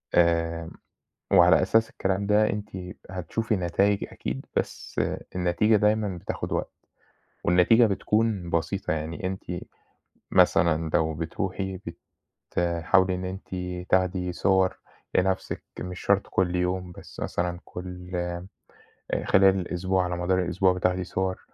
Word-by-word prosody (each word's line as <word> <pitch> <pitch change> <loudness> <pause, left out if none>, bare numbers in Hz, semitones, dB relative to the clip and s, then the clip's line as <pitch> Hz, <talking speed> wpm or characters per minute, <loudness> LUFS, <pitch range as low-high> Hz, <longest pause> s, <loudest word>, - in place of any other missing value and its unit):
آمم 85 -1 +2 0.6
وعلى 90 -1 +7
أساس 110 +4 +3
الكلام 95 +1 -1
ده 105 +1 +4
أنتِ 105 0 -4 0.4
هتشوفي 105 +4 -2
نتايج 100 +3 +1
أكيد 65 +2 -5
بس - - -2 0.4
النتيجة 90 +5 +3
دايمًا 105 -2 +1
بتاخد - - -5
وقت، - - -2 0.7
والنتيجة 90 +7 +5
بتكون 105 -2 0
بَسيطة، 85 +2 -1
يعني 80 +4 -3
أنتِ 95 0 -4 0.9
مثلًا 80 -1 +3
لو 80 -1 +2
بتروحي 95 +4 -3 0.7
بتحاولي 90 +2 +2
إن 90 0 -4
أنتِ 95 +1 -6 0.4
تاخدي 90 -1 +1
صور 95 +1 +2 0.4
لنَفْسِك 95 0 0 0.2
مش 90 0 -6
شرط 100 -1 +2
كل 90 -1 +1
يوم 90 0 -1
بس - - -11
مثلًا 85 0 -2
كل 90 0 -8 1.2
خلال 95 0 +5
الأسبوع 90 +1 0
على 90 0 -2
مدار 90 +1 +1
الأسبوع 90 +1 +2
بتاخدي 90 0 0
صور، 95 +1 -2
90 Hz, 115 wpm, -26 LUFS, 85-95 Hz, 1.2 s, وعلى